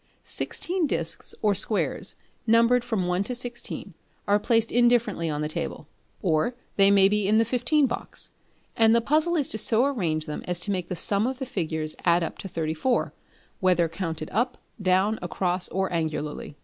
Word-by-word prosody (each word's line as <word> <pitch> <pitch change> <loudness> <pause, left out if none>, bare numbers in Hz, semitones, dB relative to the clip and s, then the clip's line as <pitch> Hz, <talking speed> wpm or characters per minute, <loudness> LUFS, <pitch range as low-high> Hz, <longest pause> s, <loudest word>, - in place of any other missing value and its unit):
Sixteen 355 -2 -1
discs - - -1
or 210 -1 +4
squares, 205 +2 0 0.3
numbered 230 +2 +4
from 205 -7 -1
1 180 +1 0
to 250 - -2
16, 240 0 -6 0.3
are 205 +1 +4
placed 225 +1 +2
indifferently 235 -8 +2
on 150 -1 -2
the 150 - -1
table 155 - -4 0.4
or 170 +7 +1 0.2
they 195 0 +5
may 200 -1 +6
be 210 0 +1
in 215 +2 +4
the 225 - +4
fifteen 250 +5 +2
box; 240 - -3 0.4
and 225 0 +5
the - - +5
puzzle 310 +8 +2
is 295 -5 +2
to 220 - -1
so 225 +4 +3
arrange 170 - -1
them 150 -2 -5
as 180 -1 -1
to 205 - 0
make 180 -3 -3
the 180 - -2
sum 200 +6 +1
of 260 0 -3
the 265 - -4
figures 160 -8 -3
add 170 0 +3
up 165 - -5
to - - -6
34, 165 +8 -1 0.5
whether 180 -3 +3
counted 165 -2 -5
up, 240 +5 0 0.2
down, 190 +3 +2
across 180 0 -1
or 190 0 -1
angularly. 150 -3 -3
200 Hz, 180 wpm, -26 LUFS, 170-240 Hz, 0.5 s, may